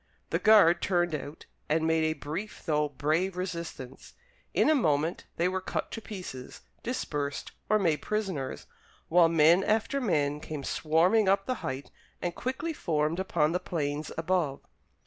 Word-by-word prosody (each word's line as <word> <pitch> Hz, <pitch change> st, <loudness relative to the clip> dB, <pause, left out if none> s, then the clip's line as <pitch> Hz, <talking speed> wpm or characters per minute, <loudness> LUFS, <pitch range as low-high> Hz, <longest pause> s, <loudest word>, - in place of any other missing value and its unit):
The -, -, +1 dB
guard 195 Hz, -6 st, +6 dB
turned 175 Hz, -3 st, +1 dB
out 145 Hz, +1 st, -6 dB, 0.2 s
and 160 Hz, +1 st, +2 dB
made 160 Hz, 0 st, +2 dB
a 155 Hz, -, +1 dB
brief 160 Hz, +8 st, -6 dB
though 150 Hz, -2 st, +1 dB
brave 160 Hz, +7 st, 0 dB
resistance. 170 Hz, -8 st, -6 dB, 0.4 s
In -, -, +3 dB
a 310 Hz, -, +6 dB
moment 160 Hz, -, +1 dB
they 170 Hz, -, +1 dB
were 185 Hz, +1 st, -1 dB
cut -, -, -3 dB
to 225 Hz, -, -5 dB
pieces, 180 Hz, -, -8 dB, 0.2 s
dispersed, 145 Hz, -, -3 dB, 0.2 s
or 215 Hz, -, +5 dB
made 165 Hz, -7 st, +1 dB
prisoners, 195 Hz, -11 st, -3 dB, 0.4 s
while 170 Hz, 0 st, +6 dB
men 165 Hz, +3 st, +5 dB
after 225 Hz, +7 st, +1 dB
men 150 Hz, -, +1 dB
came 150 Hz, -2 st, -6 dB
swarming 175 Hz, +9 st, +3 dB
up 195 Hz, 0 st, +2 dB
the 255 Hz, -, 0 dB
height 130 Hz, +2 st, -5 dB, 0.3 s
and 175 Hz, -, -2 dB
quickly 275 Hz, -, -3 dB
formed 155 Hz, -, 0 dB
upon 165 Hz, -5 st, +1 dB
the 180 Hz, -, 0 dB
plains 150 Hz, -4 st, -3 dB
above. 160 Hz, -4 st, 0 dB
165 Hz, 155 wpm, -29 LUFS, 150-190 Hz, 0.4 s, guard